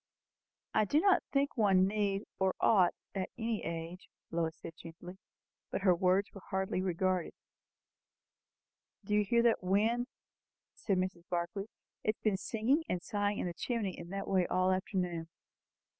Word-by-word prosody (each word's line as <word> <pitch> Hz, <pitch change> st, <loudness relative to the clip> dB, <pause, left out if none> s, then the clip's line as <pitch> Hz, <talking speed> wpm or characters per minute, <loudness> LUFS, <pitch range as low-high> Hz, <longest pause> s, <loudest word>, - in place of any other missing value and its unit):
"I 215 Hz, -, +4 dB
do 290 Hz, +9 st, +3 dB
not 390 Hz, +2 st, +4 dB
think 280 Hz, 0 st, +1 dB
one 195 Hz, -5 st, +4 dB
need 200 Hz, 0 st, 0 dB, 0.2 s
or 190 Hz, -1 st, +2 dB
ought 190 Hz, -6 st, +4 dB, 0.2 s
at 190 Hz, -2 st, -2 dB
any 225 Hz, -2 st, -2 dB
age," 165 Hz, +2 st, -5 dB, 0.2 s
Lois 165 Hz, -1 st, -1 dB
said 165 Hz, -, -8 dB
gently; 175 Hz, +3 st, -10 dB, 0.5 s
but -, -, -2 dB
her 185 Hz, -2 st, +5 dB
words 185 Hz, +3 st, +2 dB
were 195 Hz, -, -10 dB
hardly 190 Hz, -1 st, 0 dB
regarded. 185 Hz, -1 st, 0 dB, 1.7 s
"Do 210 Hz, -, -2 dB
you 210 Hz, 0 st, +4 dB
hear 235 Hz, +4 st, +3 dB
that 235 Hz, -1 st, +3 dB
wind?" 220 Hz, +6 st, +2 dB, 0.7 s
said 195 Hz, -3 st, -1 dB
Mrs. 185 Hz, -2 st, -3 dB
Barclay. 175 Hz, +3 st, -2 dB, 0.4 s
"It 215 Hz, -, +1 dB
has -, -, -56 dB
been 210 Hz, -3 st, +2 dB
singing 235 Hz, -, +1 dB
and 180 Hz, -, 0 dB
sighing 205 Hz, 0 st, 0 dB
in -, -, -2 dB
the 175 Hz, -, -3 dB
chimney 210 Hz, 0 st, -2 dB
in 170 Hz, 0 st, -9 dB
that 195 Hz, +1 st, -4 dB
way 185 Hz, -2 st, +2 dB
all 185 Hz, 0 st, +2 dB
the 185 Hz, -, +3 dB
afternoon." 180 Hz, -4 st, -3 dB
190 Hz, 160 wpm, -33 LUFS, 180-210 Hz, 1.7 s, her